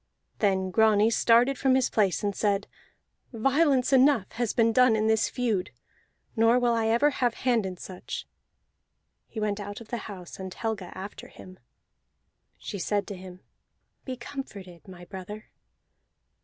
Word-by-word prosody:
Then 190 -3 +1
Grani 220 +1 +4
started 240 +4 +3
from 265 -1 +3
his 260 -1 +1
place, 200 -4 +1
and 205 -1 -1
said: 200 -1 0 0.7
"Violence 270 +2 +2
enough 265 -6 +4
has 230 -1 -1
been 230 -1 +2
done 250 -1 +5
in 215 0 0
this 220 0 +2
feud, 225 -7 -1 0.7
nor 225 +2 +4
will 245 -1 +2
I 225 -1 +1
ever 235 +7 +3
have 245 -3 0
hand 235 -6 +1
in 185 -1 -7
such." 180 +1 -7 1.0
He 220 - -7
went 210 -1 -1
out 205 0 -6
of 230 - -13
the 240 - -2
house, 185 -3 -9
and 190 -1 -6
Helga 205 -3 -4
after 195 +2 -8
him. 185 0 -14 1.0
She 200 - -6
said 205 +2 -1
to 200 - -5
him: 185 0 -11 0.6
"Be 255 -2 -5
comforted, 200 - -9
my 180 -2 -11
brother." 200 +3 -9
220 Hz, 155 wpm, -27 LUFS, 195-240 Hz, 1.0 s, done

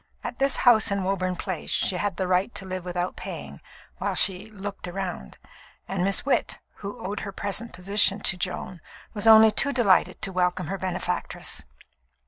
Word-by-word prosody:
At - - -6
this 275 0 +4
house 235 -4 +5
in 200 -1 -1
Woburn 185 -1 -1
Place 185 -2 -5
she 185 - +2
had 205 +2 -2
the 185 - -1
right 185 +5 +1
to 195 - -2
live 185 -1 -5
without 180 0 -3
paying, - - -8 0.4
while - - -2
she 195 +2 +2
"looked 200 -2 -7
round," 180 - -6 0.5
and 190 -2 -2
Miss 195 +4 0
Witt, 280 - 0 0.2
who 200 0 -7
owed 200 +2 -3
her 200 - -6
present 205 +4 -1
position 200 +2 +2
to 195 - +5
Joan, 180 -1 -4 0.3
was 215 0 -1
only 220 0 +8
too 280 - +2
delighted 230 -8 +2
to 195 - 0
welcome 180 -3 -1
her 195 - -3
benefactress. 180 -1 -3
195 Hz, 175 wpm, -25 LUFS, 180-205 Hz, 0.5 s, only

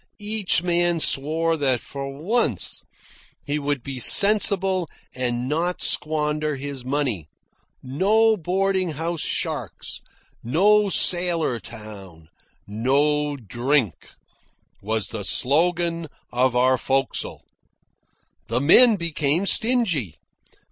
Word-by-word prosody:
Each 205 -5 0
man 175 -1 +1
swore 160 +3 +1
that 135 -4 0
for 135 +4 -7
once 155 - -2 0.6
he 145 +1 -2
would 145 -3 -3
be 135 -2 -6
sensible 195 - +3 0.2
and 125 -1 -3
not 170 +5 -2
squander 150 0 0
his 135 -1 -6
money. 130 - -2 0.5
No 210 +12 +2
boarding 185 -1 -1
house 165 +2 -4
sharks, - - -3 0.4
no 200 - +3
sailor 175 -9 +2
town, 100 -7 -11 0.4
no 145 +7 0
drink, 120 - -2 0.7
was 110 0 -3
the 110 -3 -6
slogan 165 - +1 0.3
of 125 0 +1
our 130 +1 +2
forecastle. 135 +1 -2 1.0
The 115 +2 -1
men 220 - +6
became 165 -1 -1
stingy. 195 - +2
150 Hz, 100 wpm, -22 LUFS, 125-175 Hz, 1.0 s, men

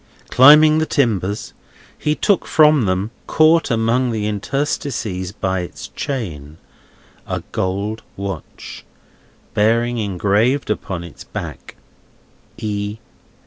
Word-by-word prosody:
Climbing 150 +4 +7
the 160 - 0
timbers, 105 -7 -1 0.4
he 150 0 -1
took 200 +1 +1
from 150 -5 +5
them, 95 +3 -1 0.2
caught 160 0 +4
among 115 +2 +1
their 110 -2 -2
interstices 105 - -2
by 95 -3 -2
its 90 - -7
chain, 80 - -5 0.7
a - - -3
gold 100 +4 -2 0.2
watch, 100 -4 -7 0.7
bearing 115 +3 +2
engraved 105 +6 +1
upon 90 -4 -3
its 85 - -11
back - - -8 0.8
E. 105 -1 -3
110 Hz, 100 wpm, -19 LUFS, 95-135 Hz, 0.8 s, Climbing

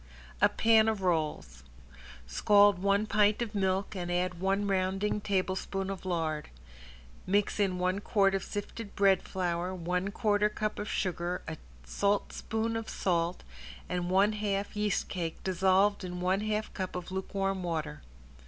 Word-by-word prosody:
~A - - +6
PAN 220 -1 +4
OF 215 -3 0
ROLLS~ 150 - -1 0.6
Scald 205 - +4
one 200 +2 +2
pint 210 0 +3
of 225 -2 -6
milk 195 0 0
and 175 -1 -3
add 180 0 -1
one 195 +2 +1
rounding 195 +2 0
tablespoon 195 -1 -1
of 190 -1 -7
lard. 160 -4 -2 0.8
Mix 205 +2 +1
in 190 -3 +1
one 185 +2 0
quart 195 -1 +2
of 195 - -1
sifted 205 +1 -6
bread 195 -2 +4
flour, 180 0 -2
one 180 +2 -1
quarter 210 0 +2
cup 215 0 -3
of 210 - -4
sugar, 175 -1 -2
a 160 - -4 0.3
saltspoon 220 - -1
of 225 -1 -4
salt 175 -1 -1 0.4
and 175 0 -2
one 195 +3 +4
half 205 -1 -2
yeast 210 -1 0
cake 170 -4 -3
dissolved 190 +2 +2
in 180 -1 -5
one 185 +2 +1
half 215 0 -2
cup 185 -2 -4
of 180 0 -5
lukewarm 195 0 -2
water. 160 - -3
195 Hz, 150 wpm, -30 LUFS, 180-205 Hz, 0.8 s, ~A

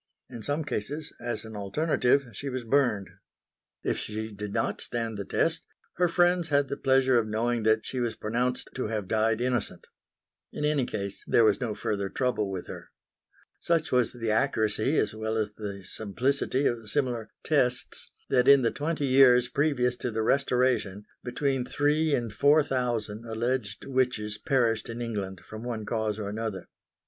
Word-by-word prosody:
In 115 - -7
some 145 +6 -1
cases, 145 +3 -4
as 120 -2 -3
an 110 -1 -9
alternative, 130 +5 +1
she 140 +7 -5
was 130 -1 -4
burned. 115 -6 +2 0.8
If - - 0
she 110 +1 -4
did 105 0 -6
not - - -1
stand 115 -2 -3
the 100 -1 -5
test 165 - 0 0.3
her 180 0 +4
friends 175 0 +3
had 145 -3 +2
the - - -2
pleasure 130 -2 +3
of 110 - -2
knowing 115 +2 0
that 110 0 +2
she 130 - -4
was 120 -2 -1
pronounced 125 +3 -1
to 130 - -2
have 105 -3 -3
died 110 +1 +1
innocent. 125 -2 -2 0.7
In 150 - -3
any 145 -4 +1
case 100 -1 -5
there 115 - +5
was 105 -2 +3
no 115 -4 -2
further 100 -2 -2
trouble 125 -4 0
with 95 -2 -4
her. - - -9 0.7
Such 165 -1 0
was 125 -2 +2
the 115 -3 -2
accuracy 110 +2 +1
as 105 - +1
well 110 0 -2
as 105 -1 -1
the 100 -2 -6
simplicity 130 +8 -1
of 115 -4 -1
similar 120 -4 -1
"tests" 125 -5 0 0.2
that, 125 0 +3
in 140 -1 +7
the 115 - +2
twenty 150 0 -2
years 130 -2 +6
previous 135 -4 +1
to 125 - -3
the 110 -1 -1
Restoration, 125 -6 +1 0.2
between 135 +1 -1
three 150 +3 +1
and 115 -3 -3
four 145 +7 +5
thousand 120 -5 -2
alleged 115 -1 -2
witches 125 -6 0
perished 115 -4 +1
in 115 +1 -5
England 100 -6 -4
from 110 0 -9
one 115 -3 -4
cause 110 -2 -1
or 105 -2 -4
another. 105 -3 -4
120 Hz, 170 wpm, -28 LUFS, 110-135 Hz, 0.8 s, in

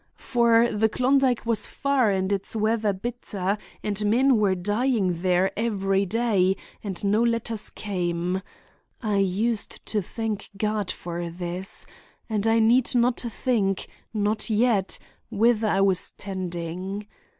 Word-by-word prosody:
For 235 -1 +3
the 220 +1 +2
Klondike 255 0 +2
was 230 -2 0
far 275 -5 +1
and 190 0 0
its 200 +2 -1
weather 215 -1 +1
bitter, 200 -2 -3 0.3
and 210 0 -1
men 245 +5 +4
were 200 -3 +2
dying 205 -2 0
there 185 +1 +2
every 195 -3 0
day, 200 -3 +2 0.3
and 195 -3 -5
no 205 +2 +2
letters 230 -2 0
came 180 -2 -2 0.6
(I 210 -2 +1
used 200 +3 -1
to 210 - 0
thank 215 +2 -4
God 210 -1 -1
for 170 0 -4
this), 180 +3 -3 0.4
and 215 -2 -1
I 225 0 +4
need 235 +3 +4
not 240 0 +3
think—not 215 -2 -1
yet—whither 220 0 +1
I 195 -2 +2
was 190 -2 +2
tending. 185 +1 -5
210 Hz, 125 wpm, -25 LUFS, 190-230 Hz, 0.6 s, men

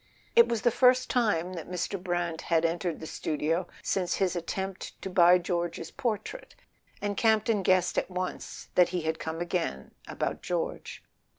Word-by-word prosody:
It 470 0 +8
was 230 -1 -1
the 240 - +4
first 255 +1 +4
time 195 -8 +1
that 170 -2 -7
Mr. 180 +1 -3
Brant 175 -3 -1
had 165 -1 +2
entered 170 0 -1
the - - -7
studio 160 +3 -1 0.2
since 185 -3 0
his 185 -2 0
attempt 190 +3 -4
to 190 - -4
buy 180 -1 +7
George's 170 -2 -3
portrait, 240 - -4 0.5
and 205 0 -1
Campton 220 -1 +3
guessed 185 -1 +3
at - - -5
once 185 0 -5
that 180 -1 +5
he 180 -1 -2
had 160 0 -2
come 160 0 -4
again 170 - -2 0.2
about - - -3
George. - - -3
180 Hz, 165 wpm, -29 LUFS, 170-200 Hz, 0.5 s, It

